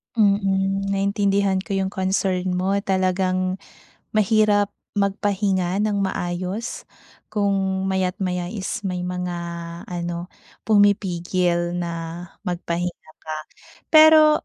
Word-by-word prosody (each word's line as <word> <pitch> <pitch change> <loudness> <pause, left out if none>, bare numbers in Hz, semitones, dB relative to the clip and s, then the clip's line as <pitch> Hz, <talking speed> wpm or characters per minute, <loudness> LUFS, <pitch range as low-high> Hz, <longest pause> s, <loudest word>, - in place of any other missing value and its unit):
Mm, 195 -2 +2
naintindihan 200 -1 +1
ko 195 +1 -4
'yong 190 0 0
concern 190 -1 0
mo. 185 +2 0
Talagang 185 -1 0 0.6
mahirap 210 -1 +3 0.2
magpahinga 200 -2 0
nang 205 -2 +1
maayos 185 +4 -3 0.5
kung 195 -2 0
maya't 190 +1 -1
maya 180 -2 -1
is 205 -1 -4
may 180 -2 -2
mga, 180 0 -3 0.5
ano, 175 0 -4 0.4
pumipigil 180 -4 +2
na 170 -1 -2 0.5
magpahinga 175 -1 -3
ka. 155 0 -4 0.5
Pero 310 -1 +7
190 Hz, 95 wpm, -23 LUFS, 180-200 Hz, 0.6 s, Pero